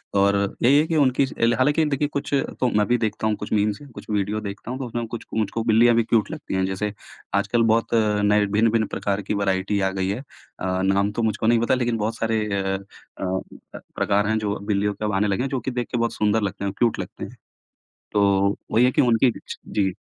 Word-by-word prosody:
और 100 0 +4 0.3
यही 135 +4 +6
है 155 - +2
कि 165 - -1
उनकी 135 -2 +3
ज 130 - -8
एल 115 0 +4
हालाँकि 150 +4 +2
देखिए 145 0 0
कुछ 140 0 -4 0.3
तो 125 - +2
मैं 105 - +3
भी 120 - +3
देखता 110 -1 -1
हूँ 105 - +1
कुछ 105 - -8
मीम्स 105 +3 +1
या 145 - -11
कुछ - - -10
वीडियो 105 +1 0
देखता 100 +3 -6
हूँ 130 - -4
तो 130 - -3
उसमें 120 0 -3
कुछ 115 0 -7
मुझको 110 +1 -1
बिल्लियाँ 115 +1 +5
भी 115 - +3
क्यूट 110 -2 +1
लगती 150 -11 -5
हैं। 95 0 +1
जैसे 95 +2 -2 0.4
आजकल 110 +4 +2
बहुत 115 +1 0
अ, 105 -2 +2
नए 105 0 +4
भिन्न-भिन्न 110 +2 +2
प्रकार 100 0 -2
की 100 - -3
वैरायटी 100 0 0
आ 95 - +2
गई 95 0 -2
है। 105 +5 -2
अ, 95 -8 -5
नाम 100 +2 +2
तो 115 - -3
मुझको 110 0 0
नहीं 115 0 +4
पता 120 - +2
लेकिन 120 -2 0
बहुत 110 +1 -2
सारे 110 -1 0 0.2
अ 95 0 -1 0.4
अ, 95 0 -5 0.2
प्रकार 100 +1 +1
हैं 110 0 +1
जो 105 -1 -2
बिल्लियों 100 0 0
के 105 +2 -5
अब 105 - -1
आने 100 +2 +2
लगे 100 +6 0
हैं, 135 - -2
जो 130 - -1
कि 130 - -4
देख 120 -1 -3
के 120 - 0
बहुत 115 0 0
सुंदर 105 +1 +1
लगते 100 0 -3
हैं, 100 - -2
क्यूट 120 -2 +1
लगते - - -6
हैं, - - -12 0.8
तो 100 -1 +3 0.2
वही 120 +3 +5
है 125 - +5
कि - - +3
उनकी 120 +1 +3
एक 120 - -2
इच - - -9 0.2
जी। 95 -3 +1
110 Hz, 245 wpm, -23 LUFS, 100-120 Hz, 0.8 s, यही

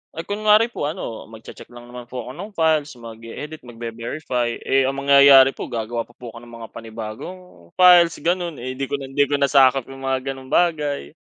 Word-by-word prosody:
Ay 165 - -5
kunwari 215 +4 +2
po 145 - -3
ano, 150 -8 -6
magche-check 110 0 -13
lang 120 0 -14
naman 125 -1 -10
po 125 -1 -6
ako 125 - -9
ng 200 +9 -10
files, 155 -3 +1
mag-i-edit, 115 +6 -9
magve-verify, 120 +1 -4
eh, 135 -1 +2
ang 135 - -2
mangyayari 140 -1 +7
po - - -7
gagawa 115 -1 -4
pa 120 - -23
po 120 -2 -10
ako 115 - -11
ng 120 0 -15
mga 115 -1 -9
panibagong 115 +9 -8 0.4
files, 175 -2 +6
ganun. 175 -1 -1
Eh, 130 0 -6
'di 135 +1 -4
ko - - -2
nan 135 -1 -8
'di 145 +1 +2
ko 145 - 0
na 140 -1 +1
sakop 135 -2 +4
yung 135 0 -8
mga 135 0 -1
ganong 135 -1 -10
bagay. 150 - 0
135 Hz, 205 wpm, -21 LUFS, 120-155 Hz, 0.4 s, mangyayari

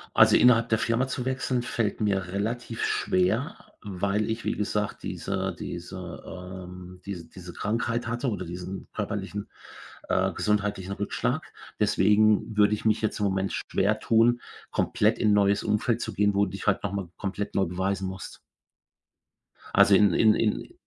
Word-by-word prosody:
Also, - - +7
innerhalb 115 -1 +5
der 110 - +3
Firma 115 +3 +1
zu 125 -1 -4
wechseln, 130 -1 -1
fällt 115 -3 -1
mir 100 -3 0
relativ 110 +5 -3
schwer, 90 0 +1 0.3
weil 100 +2 -1
ich, 110 +1 -3
wie - - +1
gesagt, 105 0 -2
diese - - -3
diese, 90 0 -7
ähm, 90 0 -9
diese 95 -4 -6
diese 90 -1 -10
Krankheit 115 +5 -2
hatte 120 +3 -1
oder 105 - -3
diesen 90 +2 -7
körperlichen, 105 -1 -4 0.6
äh, - - +2
gesundheitlichen 100 -2 -1
Rückschlag. 100 - -2 0.3
Deswegen 105 +2 +3
würde 105 0 +4
ich 105 - -10
mich 110 0 +3
jetzt 110 - -1
im 105 - +1
Moment 95 0 0
schwer 105 +3 0
tun, 115 +2 +3 0.3
komplett - - +1
in 105 - +3
neues 100 0 +3
Umfeld 110 +2 +1
zu - - -4
gehen, 105 -1 +2
wo 100 - +4
dich 100 +2 -7
halt 100 - +2
noch 100 - -2
mal 95 -4 -3
komplett 100 +1 -4
neu 95 - +3
beweisen 95 +2 -2
musst. 95 0 -8 1.3
Also 100 - +6
in 100 -2 +5
in 110 +3 +5
in 115 - -1
105 Hz, 160 wpm, -27 LUFS, 95-110 Hz, 1.3 s, Also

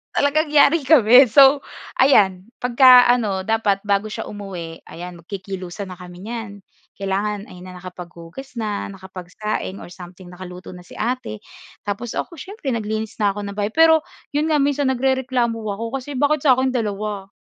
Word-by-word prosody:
talagang 295 +2 +1
yari 300 +1 +5
kami. 255 -3 +7
So 275 +1 +6 0.3
ayan 200 -6 +3
pagka 250 0 +7
ano 210 -6 +1
dapat 220 -3 +1
bago 200 +1 0
siya - - -5
umuwi, 185 -5 -8
ayan, 175 +1 -9
magkikilusan 190 +1 -7
na 185 - -8
kami 180 0 -12
niyan. 225 -3 -5 0.5
Kailangan 200 +2 -2
ayan 180 -6 -12
na, 180 - -11
nakapaghugas 180 +6 -10
na, 210 -2 -3
nakapagsaing 190 +1 -6
or - - -10
something, 180 +1 -12
nakaluto 180 0 -10
na 180 - -12
si - - -16
ate 230 - -3 0.5
tapos 210 +3 -3
ako 345 - -5
siyempre 320 - -5
naglinis 220 0 -4
na 200 - +3
ako 205 - -7
ng 200 - -7
bahay. 205 +1 -2
Pero 320 +2 +5 0.3
'yon 310 +2 +1
nga 300 - +3
minsan 280 -1 +1
nagrereklamo 260 -2 0
ako 225 +3 -4
kasi 270 +2 -6
bakit 290 +1 +1
sa'kin 260 -1 +3
2? 210 -3 -3
215 Hz, 160 wpm, -21 LUFS, 190-260 Hz, 0.5 s, kami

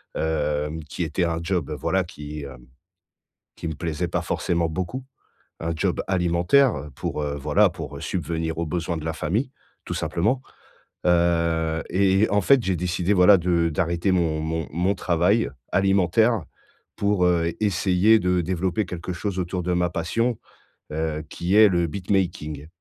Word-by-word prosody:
hem, 75 0 -1
qui 80 +4 -4
était 80 +3 -1
un 80 -1 -1
job, 85 -5 -1
voilà, 95 0 +1
qui, 75 -3 -8
hem, 65 -3 -11 0.9
qui - - -6
me 80 - -3
plaisait 85 +1 -2
pas - - -1
forcément 85 -1 -1
beaucoup. 95 +11 -4 0.6
Un 85 0 -2
job - - 0
alimentaire 90 - +2
pour, 75 - -3
heu, 70 -1 -2
voilà 70 - +3
pour, - - -7
heu, - - -10
subvenir 80 -1 -3
aux 85 - -1
besoins 85 +1 -2
de 80 - -7
la 80 - -1
famille, 100 - -1 0.3
tout - - -4
simplement. 110 +10 0 0.6
Heu 85 -2 +2
et 95 +1 +3
et 110 - +3
en 105 - +3
fait, 135 +7 +5
j'ai 95 - +1
décidé, 90 +2 0
voilà, 95 +2 +7
de 85 -1 +1
d'arrêter 85 +3 0
mon 80 -4 +1
mon 80 0 -2
mon 90 +5 +1
travail, 90 +6 +2 0.2
alimentaire, 95 +4 +3
heu, 110 - -2 0.6
pour, 100 -3 +1
heu, 85 -1 +2
essayer 95 +2 +3
de 90 -1 +1
développer 95 +4 -1
quelque 90 +1 -5
chose 95 +1 -3
autour 90 0 -2
de 90 +1 -1
ma 90 0 +1
passion, 115 +8 -1 0.6
heu, 80 -1 -2
qui 90 +3 -1
est 110 0 +8
le 85 -2 +1
beatmaking. 85 -5 -2
85 Hz, 165 wpm, -24 LUFS, 80-95 Hz, 0.9 s, est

